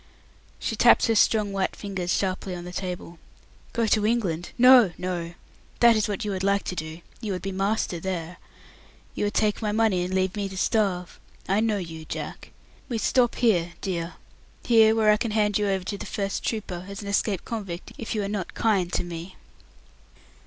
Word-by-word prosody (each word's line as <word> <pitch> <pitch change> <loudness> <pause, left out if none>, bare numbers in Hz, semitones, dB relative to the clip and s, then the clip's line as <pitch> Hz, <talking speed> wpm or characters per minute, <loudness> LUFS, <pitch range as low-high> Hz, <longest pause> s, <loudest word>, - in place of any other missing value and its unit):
She - - -3
tapped - - +6
her 230 - +2
strong 210 -1 +3
white 195 -1 -1
fingers 190 -3 -4
sharply 185 -1 -1
on 175 - -7
the 180 - -7
table. 180 -2 -5 0.5
"Go 230 -1 0
to 215 -1 +2
England? 195 -7 0
No, 250 -6 +7
no. 175 -2 -4 0.4
That 235 -1 +7
is 215 0 +1
what 210 +1 -3
you 205 - -1
would 190 -1 -3
like 200 0 +2
to 180 - -4
do. 160 0 -6 0.2
You 210 -4 -2
would 180 - -5
be 195 - -3
master 195 -2 -1
there. 175 -1 -4 0.8
You - - -1
would 205 - -2
take 215 0 +1
my 210 -1 0
money, 215 -4 +2
and 180 - -4
leave 185 0 0
me 200 -1 -2
to 190 - -8
starve. 190 -4 0 0.3
I 195 +2 +2
know 220 -1 +1
you, 165 -4 -7
Jack. - - -6 0.4
We 235 - -1
stop 240 +2 +2
here, 175 -8 +2
dear. 170 -3 -3 0.5
Here, 225 -2 +6
where 215 -1 +4
I 210 - +4
can 230 - -2
hand 210 -1 +1
you 205 - +1
over 190 -2 0
to 200 +2 -4
the - - -6
first 200 -2 -3
trooper 185 -5 -4
as 200 +1 -7
an - - -7
escaped 200 -1 0
convict 195 -7 -5
if 230 0 -4
you 210 - 0
are - - -2
not 200 -3 -4
kind 195 -6 +1
to - - +1
me." 175 +1 -7
195 Hz, 200 wpm, -25 LUFS, 180-215 Hz, 0.8 s, No